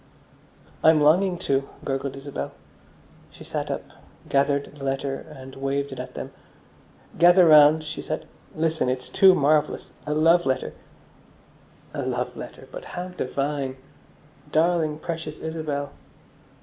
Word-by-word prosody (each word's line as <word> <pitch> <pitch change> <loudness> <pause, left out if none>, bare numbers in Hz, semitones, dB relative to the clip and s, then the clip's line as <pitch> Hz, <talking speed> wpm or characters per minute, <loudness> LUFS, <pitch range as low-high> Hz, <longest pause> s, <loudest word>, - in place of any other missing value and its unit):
"I'm 160 -1 +6
longing 175 +5 +4
to," 135 0 0 0.2
gurgled 135 0 -3
Isabel. 140 +1 -6 0.8
She - - -14
sat - - -4
up, - - -3 0.4
gathered 140 +1 +1
the 140 - -10
letter, 135 0 -1 0.2
and 135 -3 -11
waved 140 +1 -2
it 130 - -7
at 125 - -7
them. - - -6 0.9
"Gather 175 +1 +7
round," 155 0 +7
she 155 - -6
said. 155 - -5 0.3
"Listen, 160 -4 0
it's 130 0 -3
too 190 -1 +6
marvellous. 150 0 +1 0.2
A 150 - 0
love 165 +3 +5
letter!" 130 - -1 1.2
"A - - -3
love - - -2
letter! - - -9
But - - -8
how 180 +1 -4
divine!" 140 -4 -3 0.7
_Darling, 160 -1 +1
precious 160 -2 -5
Isabel. 155 -3 -4
150 Hz, 130 wpm, -24 LUFS, 135-160 Hz, 1.2 s, Gather